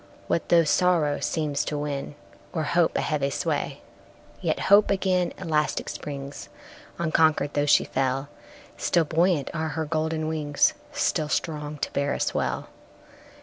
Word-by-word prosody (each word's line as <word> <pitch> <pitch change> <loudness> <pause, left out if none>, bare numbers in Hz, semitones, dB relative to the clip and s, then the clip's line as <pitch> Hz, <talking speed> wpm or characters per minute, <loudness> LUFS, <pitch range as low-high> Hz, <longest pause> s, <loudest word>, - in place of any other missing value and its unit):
What 170 - -1
though 170 -1 +6
sorrow 160 -3 +2
seems 150 -3 -1
to 150 - -2
win, 145 -1 -4 0.4
O'er 160 - 0
hope, 170 +2 +2
a - - +1
heavy 145 -2 0
sway? - - -2 0.6
Yet - - -1
Hope 200 +2 +5
again 185 -2 +1
elastic 155 -5 -1
springs, 140 -8 -7 0.5
Unconquered, 160 -3 +2
though 145 0 +1
she - - +5
fell; 135 +1 -1 0.5
Still 170 -2 +2
buoyant 165 -2 +1
are 160 0 -2
her 160 +1 -2
golden 155 0 -1
wings, 150 -2 +2 0.2
Still 155 -1 0
strong 150 -2 -2
to - - -4
bear 140 0 0
us - - -1
well. - - -2
155 Hz, 145 wpm, -26 LUFS, 145-165 Hz, 0.6 s, though